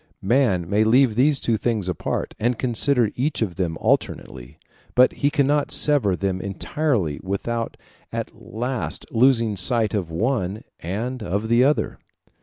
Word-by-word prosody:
Man 100 -6 +2
may 105 +3 +2
leave 120 +2 +4
these 135 +5 +3
two 115 -2 0
things 110 -3 -1
apart, 90 -4 -3
and 120 +2 0
consider 120 -1 +1
each 135 -1 -1
of 95 -5 -3
them 85 -2 -2
alternately; 65 +4 -2 0.4
but 125 +1 +5
he 145 - +1
cannot 145 0 +1
sever 135 -11 +3
them 95 0 -2
entirely 100 - -1
without 115 +5 -3 0.3
at - - -4
last 120 +3 -4
losing 115 -3 +3
sight 110 +4 +2
of 95 -6 -2
one 105 +2 -1 0.2
and 115 +9 -4
of 105 +2 -2
the 120 +2 +4
other. 145 +3 +1
115 Hz, 145 wpm, -22 LUFS, 95-130 Hz, 0.4 s, but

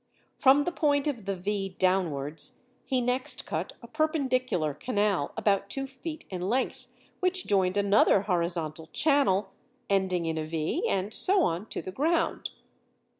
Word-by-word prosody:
From 280 +1 +5
the 355 - -2
point 290 -4 +1
of 250 -9 -3
the 195 0 -1
V 195 0 -3
downwards 160 - 0 0.2
he 260 -2 +1
next 250 +1 +1
cut - - -3
a - - -9
perpendicular 255 - 0
canal 205 - 0
about 200 -1 +1
two 270 0 -2
feet 300 +4 -8
in 180 -2 -4
length, 255 +4 -1 0.3
which 365 -1 +1
joined 190 -1 +1
another 200 -1 +4
horizontal 170 -4 -2
channel 265 - +2 0.4
ending 185 -3 +1
in 160 -1 -1
a - - -2
V, 155 -1 -1
and 195 +2 -1
so 385 -1 +4
on 175 - -1
to - - -5
the 185 - -6
ground. 320 - 0
200 Hz, 150 wpm, -28 LUFS, 180-270 Hz, 0.4 s, From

